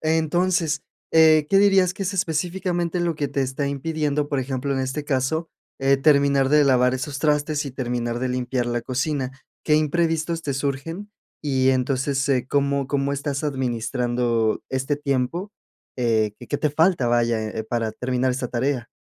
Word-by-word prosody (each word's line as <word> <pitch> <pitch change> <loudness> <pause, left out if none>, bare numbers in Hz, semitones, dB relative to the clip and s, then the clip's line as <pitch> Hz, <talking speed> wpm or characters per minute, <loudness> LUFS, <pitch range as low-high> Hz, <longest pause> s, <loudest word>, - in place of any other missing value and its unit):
Entonces, 160 +1 +1 0.3
eh, 155 -2 +6
¿qué 195 - +5
dirías 195 -3 +4
que 195 - -6
es 190 +1 -2
específicamente, 175 0 -1
lo 170 -1 0
que 145 -2 -2
te 140 0 -1
está 135 +2 -2
impidiendo, 150 0 -1
por 145 - -1
ejemplo, 130 +1 -2
en 135 - -1
este 130 +3 -3
caso, 145 +4 -1 0.3
eh, 135 +1 +4
terminar 140 -1 +3
de 150 +1 +5
lavar 125 -2 +3
esos 140 +2 -4
trastes, 150 0 +1
y - - -4
terminar 120 -2 -2
de 130 - -1
limpiar 125 0 -1
la 120 0 -1
cocina? 130 +2 -2 0.3
¿Qué 150 - +3
imprevistos 165 +1 0
te 140 -3 -2
surgen? 145 +9 -4 0.3
Y 130 -3 +1
entonces, 135 +1 0
eh, 130 -2 +1
¿cómo 140 -1 +1
cómo 140 0 0
estás 140 +1 -3
administrando 120 -3 0
este 135 +2 -1
tiempo? 145 +8 -2 0.4
Eh, 110 -4 +1
qué - - -11
¿qué 145 - 0
te 150 - +1
falta?, 160 -2 +2
vaya, 120 -1 +2
eh, 110 0 -5
para 115 -1 -2
terminar 125 +2 -1
esta 125 0 -3
tarea. 125 0 -1
140 Hz, 165 wpm, -23 LUFS, 130-155 Hz, 0.4 s, eh